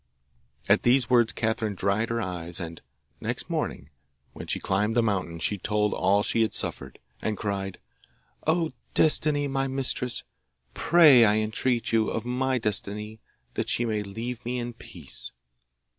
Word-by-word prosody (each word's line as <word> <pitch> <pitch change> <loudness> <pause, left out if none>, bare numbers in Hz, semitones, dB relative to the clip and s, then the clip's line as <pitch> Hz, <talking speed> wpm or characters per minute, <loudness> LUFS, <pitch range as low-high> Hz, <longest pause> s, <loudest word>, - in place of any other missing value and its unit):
At 100 +2 +4
these 125 -1 +3
words 120 -2 +5
Catherine 110 -2 -1
dried 100 +4 0
her 115 0 -1
eyes, 90 -4 -3
and 85 -2 -7 0.4
next - - -4
morning, 70 +3 -3 0.4
when - - -9
she - - -1
climbed 105 +4 0
the 120 - +3
mountain, 95 -6 -1
she 100 +5 -1
told 105 +2 0
all 100 +3 +2
she 115 - +2
had 110 - +1
suffered, 65 - -3 0.2
and 110 -2 -2
cried, 95 -2 -3 0.7
'O 165 0 +1 0.2
Destiny, 150 -2 +3
my 135 0 -1
mistress, 130 -2 0 0.5
pray, 155 -8 +6
I 105 -1 +4
entreat 115 +2 -1
you, 110 -1 +2
of 115 - -3
my 130 +1 0
Destiny 105 0 0 0.3
that - - -2
she 120 - +2
may 110 -2 -1
leave 115 +4 -6
me 125 +1 -3
in 120 0 -4
peace. - - -8
110 Hz, 155 wpm, -26 LUFS, 100-125 Hz, 0.7 s, pray